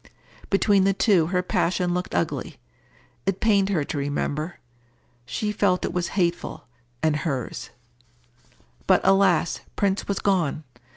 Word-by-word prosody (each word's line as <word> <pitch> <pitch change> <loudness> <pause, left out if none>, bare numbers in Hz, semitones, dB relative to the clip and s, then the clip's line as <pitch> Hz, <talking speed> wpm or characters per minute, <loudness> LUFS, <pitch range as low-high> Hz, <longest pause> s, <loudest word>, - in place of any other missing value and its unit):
Between 200 0 +3
the 195 +1 +3
two 190 -7 +3
her 180 +1 0
passion 180 0 0
looked 180 - -3
ugly. 85 - -2 0.7
It 195 -1 0
pained 200 -3 +3
her 175 -7 +1
to 145 - -4
remember. 145 +3 -2 0.7
She 210 -1 -2
felt 195 -3 +1
it - - -4
was 180 -1 -1
hateful, 175 -2 -1 0.4
and 155 -1 +2
hers. 140 -7 -4 1.2
But, - - +5
alas, 195 -4 +3 0.2
Prince 200 -1 0
was 200 - -1
gone! 175 -6 0
180 Hz, 130 wpm, -24 LUFS, 160-195 Hz, 1.2 s, But